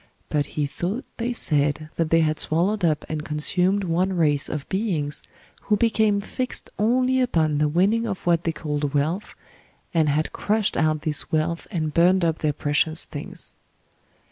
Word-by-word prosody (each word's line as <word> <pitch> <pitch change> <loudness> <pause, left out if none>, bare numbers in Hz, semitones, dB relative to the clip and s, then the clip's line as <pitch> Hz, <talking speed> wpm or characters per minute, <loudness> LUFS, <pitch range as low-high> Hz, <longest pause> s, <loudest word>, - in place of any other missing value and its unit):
But 145 -1 0
he 150 - +2
thought 180 - -3
they 235 +1 -1
said 150 - 0
that 165 -2 0
they 165 0 +4
had 155 -1 +1
swallowed 185 +6 +1
up 155 -3 +1
and 155 -1 -3
consumed 180 +6 0
one 185 +2 0
race 150 -4 +1
of 150 -2 -4
beings 180 -8 -1 0.4
who 210 - +2
became 220 -2 +2
fixed 250 +5 -3
only 255 +4 +2
upon 160 -11 +1
the 150 - +3
winning 200 +9 +2
of 195 -4 -5
what 170 -1 +2
they 165 - 0
called 150 -2 -3
wealth, 160 +8 -1 0.6
and 160 -3 +3
had 150 +2 0
crushed 215 0 0
out 155 -1 +1
this 150 -2 +1
wealth 160 +2 -1
and 155 -5 -2
burned 180 +1 +4
up 165 -1 0
their 155 - +1
precious 145 +3 0
things. 145 - -8
165 Hz, 170 wpm, -24 LUFS, 150-200 Hz, 0.6 s, they